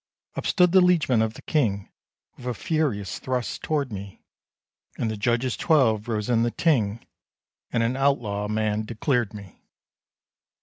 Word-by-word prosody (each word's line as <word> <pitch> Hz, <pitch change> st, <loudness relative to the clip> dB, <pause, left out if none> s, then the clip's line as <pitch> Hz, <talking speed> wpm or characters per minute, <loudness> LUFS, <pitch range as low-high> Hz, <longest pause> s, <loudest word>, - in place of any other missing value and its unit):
Up -, -, -3 dB
stood 180 Hz, -3 st, +4 dB
the 190 Hz, 0 st, +6 dB
liege 180 Hz, -3 st, +3 dB
man 120 Hz, -4 st, +4 dB
of 110 Hz, 0 st, -1 dB
the -, -, -12 dB
King, 105 Hz, -11 st, 0 dB, 0.5 s
With 125 Hz, -, -10 dB
a 125 Hz, -, 0 dB
furious 125 Hz, -, -1 dB
thrust 125 Hz, -6 st, -3 dB
toward 145 Hz, -5 st, -1 dB
me; 100 Hz, -1 st, -8 dB, 0.7 s
And 110 Hz, -, -1 dB
the -, -, -3 dB
Judges 120 Hz, +4 st, 0 dB
twelve 120 Hz, -9 st, +2 dB
rose 105 Hz, -3 st, -2 dB
in 115 Hz, -2 st, +2 dB
the 120 Hz, -, +2 dB
Ting, 115 Hz, -7 st, 0 dB, 0.7 s
And 115 Hz, -, +1 dB
an 120 Hz, +3 st, 0 dB
outlaw'd 115 Hz, -7 st, 0 dB
man 110 Hz, 0 st, 0 dB
declared 115 Hz, 0 st, -1 dB
me. 100 Hz, -3 st, -12 dB
115 Hz, 160 wpm, -25 LUFS, 105-135 Hz, 0.7 s, the